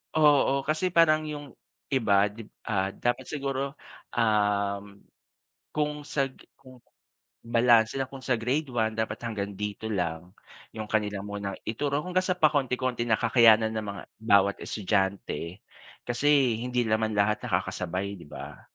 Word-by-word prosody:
Oo, 145 -3 +5 0.2
kasi 160 +4 0
parang 155 -2 +4
'yong, 145 -1 -6 0.5
iba 110 -5 +2
'di 105 +3 -9
b - - -18 0.2
ah, 95 -3 0
dapat 120 +5 -1
siguro, 135 -2 -2 0.6
uhm, 105 -3 +1 0.9
kung 150 0 0 0.2
sa 140 - +2
g - - -24 0.2
kung 130 -2 -16 0.6
balanse 115 0 +3
na 135 - 0
kung 135 0 -10
sa 130 -1 0
grade 130 +6 -1
1 110 -3 0
dapat 110 -1 -2
hanggang 100 -3 -3
dito 105 +2 -4
lang. 85 -4 -2 0.5
'Yong 110 - -3
kanilang 105 -2 -1
munang 100 -1 -5
ituro 140 +7 -1
hanggang 185 +1 0
sa 185 -1 0
pakonti-konti 130 -6 +1
na 110 - +4
kakayanan 110 -2 +5
ng 110 -1 -3
mga 100 - -6 0.2
bawat 100 -2 +4
estudyante, 95 -3 -2 0.4
kasi 120 +4 0 0.3
hindi 125 0 0
naman 110 -1 0
lahat 105 +1 +2
nakakasabay, 95 +3 -2
'di 75 - -13
ba? - - -9
115 Hz, 145 wpm, -27 LUFS, 105-135 Hz, 0.9 s, Oo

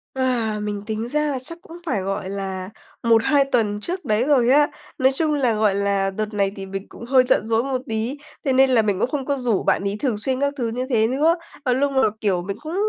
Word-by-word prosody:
À, 240 -5 0
mình 205 -1 -4
tính 220 +1 -3
ra 300 +3 0
là 265 - -2
chắc 335 +7 -9
cũng 335 0 -11
phải, 235 - -1
gọi 195 0 -3
là, 190 -1 -4 0.3
1-2 235 +5 +4
tuần 215 -6 0
trước 355 - -4
đấy 215 +1 +2
rồi 260 -4 +3
á. 290 +2 +5 0.3
Nói 265 +1 +4
chung 310 +1 +1
là, 260 -5 +2
gọi 210 -2 +2
là, 200 -1 +1
đợt 215 +2 -4
này 200 -1 +1
thì 195 - -6
mình 195 +1 -6
cũng 235 - -10
hơi 255 0 +5
giận 215 - +2
dỗi 225 +1 +2
một 260 -2 -2
tí, 225 +5 -2 0.3
thế 270 - +2
nên 265 +1 +5
là 245 -3 +4
mình 205 -3 0
cũng - - +1
không 275 -1 -3
có 280 0 0
rủ 240 -6 0
bạn - - +2
ấy 200 +1 -2
thường 245 -7 0
xuyên 255 +4 -2
các 280 0 +1
thứ 240 -3 -1
như 250 +3 -3
thế 225 -4 +3
nữa. 300 +7 +3 0.3
Và 250 - +3
lúc 280 +2 +1
mà, 265 - +2 0.2
kiểu, 190 -5 +1
mình 200 +2 -5
cũng 315 +3 -5
235 Hz, 250 wpm, -22 LUFS, 205-270 Hz, 0.3 s, á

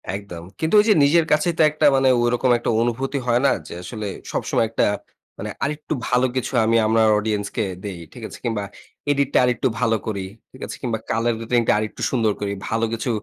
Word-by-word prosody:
একদম। 90 -5 -8 0.2
কিন্তু 160 +5 -1
ওই 210 - +4
যে, - - +8
নিজের 160 +3 +4
কাছেই 155 +3 +3
তো - - +6
একটা 150 0 0
মানে 135 -1 +4
ঐরকম 120 +1 +1
একটা 120 - -3
অনুভূতি 130 +4 -1
হয় 120 +1 +3
না, - - +5 0.2
যে, - - -8
আসলে 110 +2 -6 0.3
সবসময় 115 - 0
একটা 115 - +1 0.5
মানে - - -5
আরেকটু 150 +2 -2 0.2
ভালো 125 +1 +3
কিছু 130 +1 -2
আমি 115 +1 +3
আমার 110 0 +4
অডিয়েন্স 105 -1 -1
কে 110 - +1 0.2
দেই। 95 -4 -6
ঠিক - - -11
আছে? - - -10
কিংবা 110 -3 -1 0.5
এডিটটা 140 -1 +1
আরেকটু 125 0 +1
ভালো 115 -2 +2
করি। 100 -3 -2 0.3
ঠিক 130 - -15
আছে? - - -7
কিংবা 115 -4 -2
কালার 115 +1 +1
রেটিং 120 +1 +1
টা - - +5
আরেকটু 110 0 -4
সুন্দর 115 -5 +2
করি। 100 -1 -2 0.2
ভালো 115 +1 +1
কিছু 115 +2 -3
120 Hz, 205 wpm, -22 LUFS, 110-135 Hz, 0.5 s, যে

